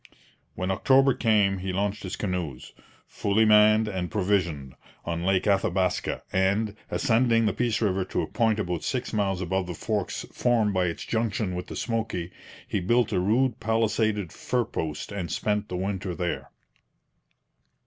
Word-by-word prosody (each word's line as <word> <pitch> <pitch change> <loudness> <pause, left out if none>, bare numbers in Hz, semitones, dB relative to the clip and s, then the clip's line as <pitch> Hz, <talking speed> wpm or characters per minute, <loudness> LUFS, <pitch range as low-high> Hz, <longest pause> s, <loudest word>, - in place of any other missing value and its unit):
When 90 +1 -2
October 135 +7 +4
came 105 -5 +2
he 95 +1 -3
launched 100 +2 -1
his 95 - -5
canoes, 90 -10 -4 0.3
fully 105 +2 +1
manned 105 0 +6
and 95 -4 -3
provisioned, 90 -10 0 0.3
on 85 0 -2
Lake 95 0 +2
Athabaska, 95 -3 0
and, 100 +3 +1
ascending 115 -2 +2
the 105 - +1
Peace 120 -2 0
river 95 -3 +1
to - - -2
a - - -4
point 110 -3 +1
about 90 -5 -2
six 125 -3 -2
miles 100 -3 0
above 95 +1 -1
the 90 - -5
forks 105 +2 -2
formed 115 -4 +2
by 90 -1 +2
its 85 -2 -3
junction 110 -4 -1
with 90 0 -5
the - - -7
Smoky, 110 -7 -2 0.4
he - - -1
built 120 +5 +2
a - - +1
rude 115 +6 +1
palisaded 110 -4 0
fur 125 -2 -1
post 80 -4 -4
and 90 -6 -4
spent 105 0 -1
the 90 - -3
winter 95 -1 -3
there. 90 -1 -3
100 Hz, 160 wpm, -26 LUFS, 90-110 Hz, 0.4 s, manned